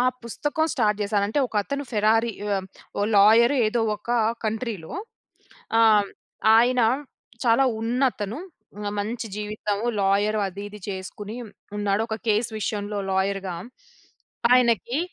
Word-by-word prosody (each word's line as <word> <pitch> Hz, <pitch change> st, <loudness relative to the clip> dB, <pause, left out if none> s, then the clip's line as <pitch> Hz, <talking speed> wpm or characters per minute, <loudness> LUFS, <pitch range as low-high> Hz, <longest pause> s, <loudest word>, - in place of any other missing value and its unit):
ఆ -, -, +4 dB, 0.2 s
పుస్తకం 295 Hz, +7 st, -1 dB
స్టార్ట్ 210 Hz, -5 st, +1 dB
జేశాను. 200 Hz, 0 st, +1 dB
అంటే, 255 Hz, -, -1 dB
ఒకతను 280 Hz, +7 st, -2 dB
ఫెరారి 225 Hz, +2 st, +3 dB
యొ 205 Hz, 0 st, -2 dB, 0.5 s
ఓ -, -, +2 dB
లాయరు 230 Hz, +7 st, +6 dB
ఏదో 230 Hz, +2 st, 0 dB, 0.2 s
ఒక 210 Hz, -, -23 dB, 0.4 s
కంట్రీలో. 220 Hz, -3 st, -3 dB, 0.9 s
ఆహ్, 215 Hz, -2 st, +6 dB
హ్మ్. -, -, -14 dB, 0.5 s
ఆయన 245 Hz, +2 st, +4 dB, 0.6 s
చాలా 235 Hz, +3 st, +4 dB, 0.2 s
ఉన్నతను. 230 Hz, -1 st, -1 dB, 0.6 s
మంచి 225 Hz, +3 st, -4 dB
జీవితము. 210 Hz, +1 st, -3 dB
లాయర్ 205 Hz, +2 st, +2 dB
అది 195 Hz, +2 st, -8 dB
ఇది 210 Hz, 0 st, -11 dB
చేసుకుని 200 Hz, +3 st, -6 dB, 0.4 s
ఉన్నాడు. 205 Hz, +1 st, +1 dB
ఒక 220 Hz, -, -2 dB
కేస్ 215 Hz, +2 st, +2 dB
విషయంలో 205 Hz, 0 st, -2 dB
లాయర్‌గా 190 Hz, -1 st, -1 dB, 1.0 s
ఆయనకి, 240 Hz, -, +3 dB
215 Hz, 120 wpm, -24 LUFS, 205-235 Hz, 1.0 s, లాయరు